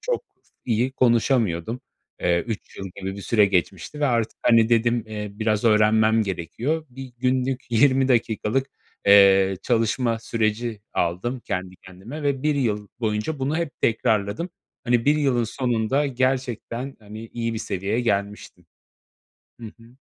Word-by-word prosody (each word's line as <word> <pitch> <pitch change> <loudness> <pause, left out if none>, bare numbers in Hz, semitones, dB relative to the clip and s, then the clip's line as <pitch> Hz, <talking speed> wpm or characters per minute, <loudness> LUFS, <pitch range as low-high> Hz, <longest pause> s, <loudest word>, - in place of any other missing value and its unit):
çok - - -2 0.4
iyi 125 +2 0
konuşamıyordum. 115 -5 +1 0.4
Eee, 85 0 +1
3 115 -3 -6
yıl 95 - -6
gibi 95 0 -5
bir 100 - -8
süre 105 -1 +3
geçmişti 95 - -2
ve 145 - +3
artık 115 -3 0
hani 115 -1 +5
dedim, 115 0 +2
eee, 105 -1 -5
biraz 110 0 0
öğrenmem 110 0 +4
gerekiyor. 115 - -3
1 130 0 -9
günlük, 130 +1 0
20 130 +3 +4
dakikalık, 120 +1 +1 0.4
eee, 95 -1 +6
çalışma 115 0 +1
süreci 115 0 -2
aldım 90 +9 -1
kendi 90 0 -4
kendime 100 +12 -10
ve 140 -2 -1
1 150 -1 +2
yıl 105 -7 -1
boyunca 110 +7 -1
bunu 140 +4 -1
hep 165 -4 -4
tekrarladım. 110 - 0 0.4
Hani, 120 -2 +2
1 150 +1 +4
yılın 130 -5 +1
sonunda 125 +3 0
gerçekten, 130 -1 -2
hani, 110 +1 -10
iyi 115 0 -3
bir - - -3
seviyeye 100 +2 -2
gelmiştim. 100 -5 -3 0.9
Hı 115 - -7
hı. 115 +3 -15
115 Hz, 140 wpm, -23 LUFS, 105-130 Hz, 0.9 s, eee